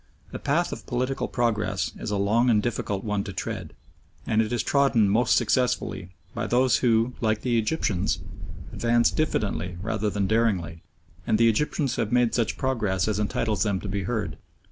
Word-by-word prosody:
The -, -, -6 dB
path 165 Hz, +5 st, 0 dB
of -, -, -8 dB
political 130 Hz, +1 st, -1 dB
progress 105 Hz, -5 st, -1 dB
is -, -, -4 dB
a 105 Hz, -, -1 dB
long 110 Hz, +5 st, +2 dB
and 110 Hz, -3 st, +4 dB
difficult 105 Hz, -3 st, -2 dB
one 105 Hz, -2 st, -1 dB
to 100 Hz, -, -6 dB
tread, 95 Hz, -, -5 dB, 0.5 s
and 110 Hz, -, +2 dB
it 110 Hz, -, -2 dB
is 120 Hz, -2 st, 0 dB
trodden 135 Hz, -7 st, +3 dB
most 115 Hz, +4 st, +3 dB
successfully 110 Hz, -7 st, 0 dB, 0.2 s
by -, -, -3 dB
those 125 Hz, +1 st, +3 dB
who, 115 Hz, 0 st, +2 dB
like 110 Hz, -2 st, +1 dB
the 120 Hz, -2 st, +1 dB
Egyptians, 110 Hz, -, 0 dB, 0.6 s
advance 120 Hz, 0 st, +2 dB
diffidently 95 Hz, -, -1 dB
rather 110 Hz, +2 st, -1 dB
than 100 Hz, 0 st, -1 dB
daringly, 95 Hz, -7 st, 0 dB, 0.5 s
and 110 Hz, -, +3 dB
the 115 Hz, +1 st, +5 dB
Egyptians 140 Hz, +3 st, 0 dB
have 110 Hz, -2 st, -1 dB
made 120 Hz, -1 st, +3 dB
such 115 Hz, -2 st, 0 dB
progress 110 Hz, -9 st, 0 dB
as 105 Hz, -1 st, 0 dB
entitles 105 Hz, 0 st, -1 dB
them 100 Hz, -3 st, +1 dB
to 100 Hz, -, -7 dB
be 100 Hz, -1 st, -3 dB
heard. 110 Hz, -2 st, -2 dB
110 Hz, 175 wpm, -25 LUFS, 100-120 Hz, 0.6 s, the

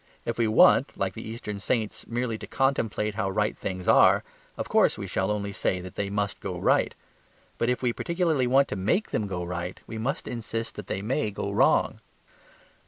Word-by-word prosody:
If 115 Hz, 0 st, -3 dB
we 115 Hz, -, +3 dB
want, 110 Hz, -, +5 dB
like -, -, -1 dB
the -, -, -7 dB
Eastern 105 Hz, -3 st, -5 dB
saints, 110 Hz, 0 st, -2 dB
merely 120 Hz, -1 st, -2 dB
to -, -, -8 dB
contemplate 115 Hz, -6 st, 0 dB
how 100 Hz, -2 st, -1 dB
right 105 Hz, +2 st, 0 dB
things 95 Hz, -1 st, -5 dB
are, -, -, +6 dB, 0.3 s
of -, -, -3 dB
course -, -, +3 dB
we -, -, -5 dB
shall 95 Hz, +1 st, -1 dB
only 100 Hz, -1 st, -1 dB
say 95 Hz, -1 st, -1 dB
that 90 Hz, 0 st, -8 dB
they 100 Hz, -1 st, -2 dB
must 100 Hz, 0 st, -2 dB
go 90 Hz, -2 st, -4 dB
right. -, -, +2 dB, 0.6 s
But 115 Hz, -, +1 dB
if 125 Hz, +1 st, -1 dB
we 120 Hz, -1 st, +2 dB
particularly 170 Hz, -6 st, 0 dB
want 135 Hz, +2 st, +4 dB
to -, -, -2 dB
MAKE 110 Hz, -, 0 dB
them 105 Hz, -1 st, -1 dB
go 90 Hz, -2 st, -3 dB
right, 90 Hz, +1 st, -4 dB
we 110 Hz, 0 st, -6 dB
must 135 Hz, +7 st, -2 dB
insist 115 Hz, -1 st, -4 dB
that 105 Hz, -, -8 dB
they 95 Hz, -, -3 dB
may 125 Hz, +1 st, 0 dB
go 100 Hz, 0 st, -4 dB
wrong. 100 Hz, -, +3 dB
105 Hz, 200 wpm, -27 LUFS, 100-120 Hz, 0.6 s, are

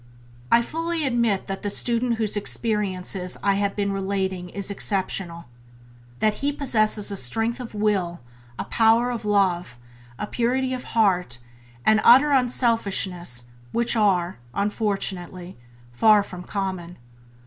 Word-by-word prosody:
I 235 Hz, -, +6 dB
fully 330 Hz, +3 st, -2 dB
admit 235 Hz, -6 st, +1 dB
that 195 Hz, 0 st, -5 dB
the 205 Hz, -, -2 dB
student 235 Hz, +3 st, 0 dB
whose 220 Hz, -2 st, -1 dB
experiences 195 Hz, -4 st, -2 dB
I 200 Hz, -, +3 dB
have 200 Hz, -1 st, -1 dB
been 200 Hz, -1 st, -1 dB
relating 190 Hz, -2 st, -2 dB
is 200 Hz, +2 st, -4 dB
exceptional 190 Hz, -4 st, -1 dB, 0.4 s
— 120 Hz, 0 st, -25 dB
that 215 Hz, -1 st, +3 dB
he 285 Hz, +1 st, +1 dB
possesses 215 Hz, -7 st, 0 dB
a -, -, -3 dB
strength 225 Hz, -, -1 dB
of 235 Hz, -3 st, -8 dB
will, 195 Hz, -5 st, 0 dB, 0.4 s
a -, -, -3 dB
power 230 Hz, +2 st, +3 dB
of 230 Hz, -3 st, -5 dB
love, 180 Hz, -10 st, +1 dB, 0.4 s
a -, -, -3 dB
purity 255 Hz, +4 st, 0 dB
of 255 Hz, -, -5 dB
heart 180 Hz, -, +2 dB, 0.5 s
and 215 Hz, 0 st, +5 dB
an -, -, -3 dB
utter 270 Hz, +5 st, +7 dB
unselfishness 200 Hz, -, +1 dB, 0.3 s
which 235 Hz, 0 st, +2 dB
are, 185 Hz, -, +1 dB, 0.2 s
unfortunately, 195 Hz, -4 st, -2 dB, 0.4 s
far 210 Hz, -, +5 dB
from 180 Hz, -3 st, -9 dB
common. 185 Hz, -3 st, -4 dB
205 Hz, 135 wpm, -24 LUFS, 185-230 Hz, 0.5 s, utter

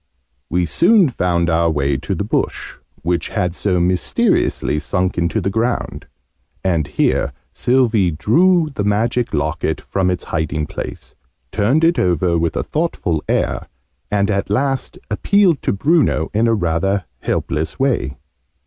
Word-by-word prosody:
We 90 Hz, +1 st, +1 dB
soon 180 Hz, -, +4 dB
found 85 Hz, -7 st, 0 dB
our 85 Hz, 0 st, +2 dB
way 70 Hz, -3 st, 0 dB
to -, -, -3 dB
the -, -, -2 dB
bush, -, -, -2 dB, 0.3 s
which 85 Hz, +1 st, -1 dB
had 90 Hz, -5 st, -1 dB
so 90 Hz, -1 st, 0 dB
mysteriously 90 Hz, -3 st, +1 dB
sunk 90 Hz, +3 st, -1 dB
into 85 Hz, +5 st, 0 dB
the 95 Hz, 0 st, -1 dB
ground: 115 Hz, +3 st, -2 dB, 0.6 s
and 85 Hz, -6 st, +1 dB
here -, -, 0 dB, 0.2 s
Sylvie 120 Hz, -7 st, +2 dB
drew 160 Hz, -, +3 dB
the 105 Hz, -, -2 dB
Magic 115 Hz, +4 st, 0 dB
Locket 80 Hz, +1 st, -1 dB
from 95 Hz, -2 st, -1 dB
its 90 Hz, -1 st, -2 dB
hiding 80 Hz, -2 st, -2 dB
place, -, -, -7 dB, 0.4 s
turned 115 Hz, +10 st, +2 dB
it 170 Hz, +1 st, +3 dB
over 90 Hz, -1 st, +1 dB
with 85 Hz, 0 st, -1 dB
a -, -, 0 dB
thoughtful 125 Hz, -, -2 dB
air, -, -, 0 dB, 0.4 s
and 100 Hz, 0 st, +1 dB
at 100 Hz, -1 st, -1 dB
last 135 Hz, +5 st, -1 dB
appealed 185 Hz, -, +3 dB
to -, -, 0 dB
Bruno 140 Hz, -, +1 dB
in 110 Hz, +3 st, +2 dB
a 115 Hz, -, +3 dB
rather 90 Hz, +1 st, 0 dB
helpless 80 Hz, +1 st, -2 dB
way. 120 Hz, -, 0 dB
95 Hz, 145 wpm, -18 LUFS, 85-120 Hz, 0.6 s, soon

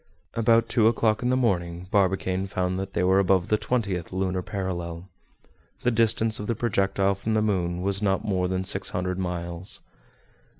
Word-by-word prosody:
About 115 Hz, 0 st, +3 dB
two 110 Hz, -2 st, +3 dB
o'clock 110 Hz, -1 st, +2 dB
in 125 Hz, -, 0 dB
the 130 Hz, -, +2 dB
morning 90 Hz, -7 st, -1 dB
Barbicane 95 Hz, -1 st, +1 dB
found 95 Hz, -1 st, -1 dB
that 95 Hz, 0 st, -5 dB
they 90 Hz, -, 0 dB
were 95 Hz, +1 st, +4 dB
above 95 Hz, -2 st, +2 dB
the 105 Hz, -, +3 dB
twentieth 100 Hz, -9 st, -2 dB
lunar 95 Hz, 0 st, -1 dB
parallel. 90 Hz, -3 st, -4 dB, 0.8 s
The 125 Hz, -, +3 dB
distance 115 Hz, -1 st, +2 dB
of 105 Hz, -, -5 dB
the 115 Hz, -, 0 dB
projectile 100 Hz, -3 st, +1 dB
from 105 Hz, +3 st, -2 dB
the -, -, +3 dB
moon 90 Hz, -4 st, -1 dB
was 100 Hz, +1 st, 0 dB
not 95 Hz, -2 st, +1 dB
more 95 Hz, -3 st, 0 dB
than 95 Hz, 0 st, -1 dB
six 95 Hz, -, +1 dB
hundred 90 Hz, 0 st, -2 dB
miles. 85 Hz, 0 st, -4 dB
95 Hz, 175 wpm, -26 LUFS, 90-110 Hz, 0.8 s, were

